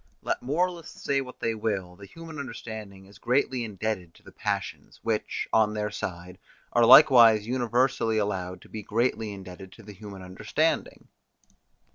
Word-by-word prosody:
Let - - -1
moralists 170 +5 -2
say 140 -1 +1
what 125 -1 -10
they 115 - 0
will, 100 -5 -3
the 100 +2 -12
human 160 +7 -10
understanding 110 -7 -8
is 100 +1 -17
greatly 125 +1 +1
indebted 105 -5 -4
to - - -21
the - - -14
passions, - - -4
which, 110 -2 -2
on 110 -1 +3
their 105 0 -2
side, 90 -2 -6 0.3
are 120 -1 +5
likewise 120 -5 +8
universally 120 -1 +1
allowed 95 -3 -2
to - - -16
be 110 - -6
greatly 110 +1 -1
indebted 95 -1 -10
to 115 - -15
the 105 0 -11
human 100 -1 -10
understanding. 90 0 -2
110 Hz, 155 wpm, -27 LUFS, 95-120 Hz, 0.3 s, likewise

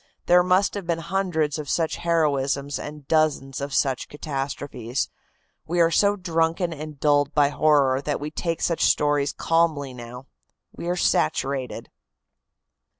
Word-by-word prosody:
There 180 0 +6
must 185 +2 +2
have 200 -4 -6
been 170 -1 +1
hundreds 165 -3 -1
of 145 -3 -6
such 165 -2 0
heroisms 145 -4 0
and 150 -2 -8
dozens 150 -4 +1
of 140 +1 -4
such 135 -2 0
catastrophes. 140 -4 -4 0.6
We 175 +2 -1
are 165 0 +4
so 200 +3 +3
drunken 170 -2 0
and 155 -1 -8
dulled 145 -1 +2
by 145 -2 +4
horror 145 -3 +3
that 145 0 -2
we 150 +1 -5
take 165 +1 -3
such 170 - 0
stories 145 -1 +2
calmly 160 -5 0
now. 125 +1 -9 0.5
We 170 - -6
are 180 - +1
saturated." 130 - -1
150 Hz, 145 wpm, -24 LUFS, 140-165 Hz, 0.6 s, There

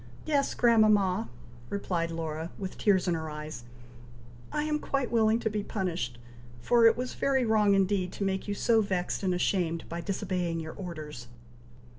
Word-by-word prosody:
"Yes, 290 -3 +1
grandmama," 215 - +4 0.4
replied 175 -4 -1
Laura, 160 0 -4
with 190 -2 -5
tears 190 -4 +2
in 175 - +2
her 160 -1 -3
eyes, 150 -4 -7 0.9
"I 300 0 -1
am 300 0 0
quite 275 -4 -2
willing 225 -1 +3
to - - -1
be 210 -1 -1
punished, 180 - -3 0.4
for 230 - +5
it 225 - +4
was 250 0 -3
very 265 -2 +1
wrong 210 -2 +4
indeed 190 -1 +1
to - - -4
make 190 0 -1
you 205 - -2
so 225 +2 +3
vexed 185 -3 -2
and 190 -2 +1
ashamed, 175 -2 0
by 170 +1 -4
disobeying 180 -2 -2
your 160 0 -6
orders." 155 -9 -7
190 Hz, 165 wpm, -29 LUFS, 165-220 Hz, 0.9 s, for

